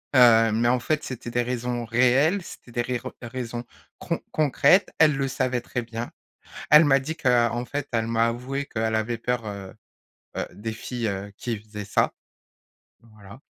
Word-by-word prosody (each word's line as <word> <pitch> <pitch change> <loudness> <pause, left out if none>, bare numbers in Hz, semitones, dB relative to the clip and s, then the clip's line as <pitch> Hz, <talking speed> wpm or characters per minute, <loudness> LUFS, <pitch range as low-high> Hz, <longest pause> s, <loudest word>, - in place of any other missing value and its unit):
Heu, 115 -3 +7
mais 115 +2 +1
en 125 +1 +3
fait 150 +5 -1
c'était 120 -2 -6
des 120 +1 +1
raisons 120 0 -3
réelles, 130 - +3
c'était 120 - -12
des 120 - -1
rires 125 -1 -4
raisons 120 -1 -5 0.4
con - - -2
concrètes. 150 +5 +3
Elle 155 -3 +6
le 135 0 0
savait 125 -2 -1
très 125 +1 -4
bien. 115 0 -6 0.6
Elle 150 +3 +9
m'a 135 -1 +4
dit 160 +5 -5
que, 130 - 0
heu 120 -1 +4
en 120 +1 -2
fait 145 +1 -3
elle 115 -1 0
m'a 115 0 +2
avoué 130 +4 -3
que, 115 - -7
heu, - - 0
elle 110 0 0
avait 110 +1 -1
peur, 120 -1 -2
heu 100 -2 -7 0.6
heu, - - -2
des 110 +2 -5
filles, 115 +1 -4
heu, 100 0 -4
qui 115 -3 -3
faisaient 105 -1 -9
ça. 105 - +1 0.9
Voilà. 105 -2 -15
120 Hz, 190 wpm, -25 LUFS, 115-130 Hz, 0.9 s, Elle